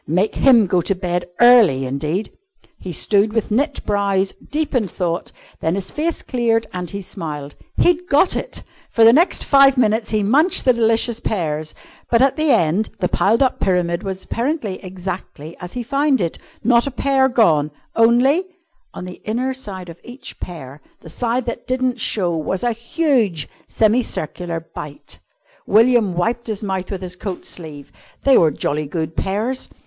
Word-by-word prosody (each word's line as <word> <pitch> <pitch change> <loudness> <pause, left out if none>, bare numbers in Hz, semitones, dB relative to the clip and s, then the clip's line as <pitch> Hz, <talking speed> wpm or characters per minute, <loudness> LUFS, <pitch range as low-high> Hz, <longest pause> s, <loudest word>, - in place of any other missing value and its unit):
Make 180 +7 +1
him 240 -6 +5
go 180 -1 +1
to 195 - -1
bed 175 -1 -2 0.2
early 225 - +6
indeed! 150 +10 -3 0.4
He 185 - -7
stood 205 +5 +1
with 225 -1 -1
knit 280 +6 0
brows, 200 -2 +1 0.2
deep 305 0 -2
in 235 -6 +1
thought, 175 -2 -3 0.3
then 160 +2 0
his 195 -1 -3
face 325 +2 -2
cleared 230 -3 0
and 180 -2 -4
he 200 -1 -6
smiled. 150 -6 -6 0.2
He'd 355 +1 +2
got 300 +5 +3
it! - - -4 0.3
For 230 - +3
the 225 +1 +8
next 335 +7 +3
five 275 -1 +5
minutes 220 -2 +1
he 215 -1 0
munched 295 - +3
the 255 - +5
delicious 230 0 +2
pears, 155 -8 -3 0.3
but, 230 - +3
at 270 +1 +3
the 310 -1 0
end, 180 - +2
the 180 - 0
piled 225 +6 +2
up 260 - 0
pyramid 175 -2 0
was 190 -1 -5
apparently 235 - -3
exactly 180 -4 -7
as 180 0 -8
he 245 - -4
found 275 +1 +1
it, 170 -3 -2 0.2
not 235 +2 +3
a - - 0
pear 270 0 +2
gone, 160 - +3 0.3
only 245 +10 +4 0.5
on 180 - -6
the 180 -1 -10
inner 250 +5 -1
side 200 -8 -7
of 170 0 -11
each 250 +2 -10
pear, 150 -5 -9 0.2
the - - -12
side 235 +7 -2
that 235 - -5
didn't 255 -1 -1
show, 180 -6 0
was 165 +5 -3
a 240 - +2
huge 235 - 0 0.2
semicircular 180 -7 -1
bite. 145 -1 -9 0.5
William 225 -3 +4
wiped 230 +7 -1
his 215 -1 -4
mouth 190 -2 -3
with 195 -2 -5
his 180 0 -6
coat 185 0 -6
sleeve. 150 -5 -9 0.3
They 275 -1 +5
were 165 - +5
jolly 150 +1 -2
good 160 +1 -4
pears. 220 +9 -2
210 Hz, 170 wpm, -19 LUFS, 175-250 Hz, 0.5 s, the